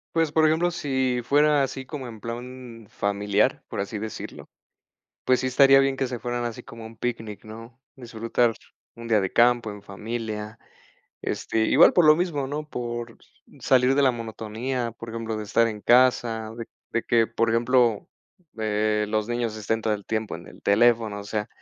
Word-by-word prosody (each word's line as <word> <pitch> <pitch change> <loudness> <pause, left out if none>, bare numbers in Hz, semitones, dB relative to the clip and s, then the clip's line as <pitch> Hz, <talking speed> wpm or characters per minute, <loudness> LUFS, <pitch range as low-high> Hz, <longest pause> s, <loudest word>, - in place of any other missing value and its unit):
Pues, 165 -2 +1
por 160 0 +4
ejemplo, 160 +3 +2
si 130 -6 -1
fuera 145 +2 +3
así 135 0 -4
como 135 -1 -7
en 115 -3 -9
plan 120 0 -8
familiar, 100 +1 0
por - - -5
así 100 +2 -3
decirlo, 110 0 -7 0.8
pues 130 -1 +3
sí, - - -2
estaría 135 +1 +6
bien 135 -1 +1
que 135 - 0
se 125 -1 -5
fueran 120 0 -3
así 120 -2 -5
como 115 -1 -10
un 115 0 -13
picnic, 110 -3 -5
¿no?, 115 +2 -11 0.2
disfrutar 115 -1 0 0.4
un 115 0 -9
día 110 -2 +4
de 95 - -2
campo 120 -1 +3
en 105 -1 -10
familia, 110 +1 -6 0.6
este, - - -2
igual 140 +8 +6
por 175 - +4
lo 155 0 +8
mismo, 155 -5 -1
¿no?, 150 +2 -5
por 120 -3 -5 0.4
salir 130 0 +3
de 140 - +4
la 130 -2 +4
monotonía, 115 +2 -4
por 115 +1 -10
ejemplo, 115 -1 -4
de 110 - -4
estar 110 +2 +2
en 110 -2 -4
casa 120 -2 +3
de 115 -1 -6 0.3
de 115 - 0
que, 115 -1 +3
por 115 0 0
ejemplo, 115 -1 +2 0.5
eh, 105 0 0
los 110 0 -1
niños 120 -2 -2
estén 110 +1 -1
todo 110 0 0
el 100 -1 -8
tiempo 110 -1 -2
en - - -13
el - - -14
teléfono, 110 0 +3
o - - -9
sea, 105 0 -3
115 Hz, 185 wpm, -25 LUFS, 110-130 Hz, 0.8 s, lo